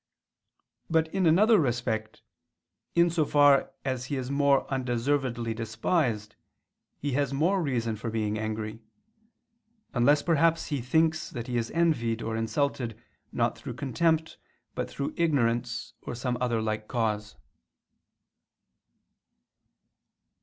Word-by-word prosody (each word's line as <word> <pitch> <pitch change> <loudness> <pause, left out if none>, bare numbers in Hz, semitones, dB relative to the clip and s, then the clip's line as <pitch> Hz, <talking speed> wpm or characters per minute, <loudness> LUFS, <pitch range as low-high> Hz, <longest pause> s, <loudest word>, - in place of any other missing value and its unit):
But 160 -1 +1
in 190 -3 +2
another 210 +7 +5
respect, 120 -5 -2 0.7
in 170 0 +4
so 165 -2 +2
far 145 -1 +4
as 130 -2 -2
he 140 - -3
is 130 0 -3
more 140 -1 +3
undeservedly 125 -2 -1
despised, 115 - -1 0.6
he 145 - -3
has 140 0 0
more 180 +7 +2
reason 120 -7 -1
for 110 +2 -5
being 110 -1 -1
angry: 110 0 -4 1.1
unless 140 +4 +4
perhaps 165 0 +2
he 145 -4 -1
thinks 160 +5 +1
that 120 -2 -6
he 125 - -4
is 115 -1 -1
envied 120 -9 +1
or 110 0 -2
insulted 120 0 -1 0.3
not - - 0
through - - -7
contempt 160 +3 0 0.3
but - - -3
through 140 - -4
ignorance, 120 -7 0
or - - -6
some 125 +1 -2
other 120 -3 0
like 110 0 -2
cause. 110 -3 -2
130 Hz, 120 wpm, -28 LUFS, 115-155 Hz, 1.1 s, another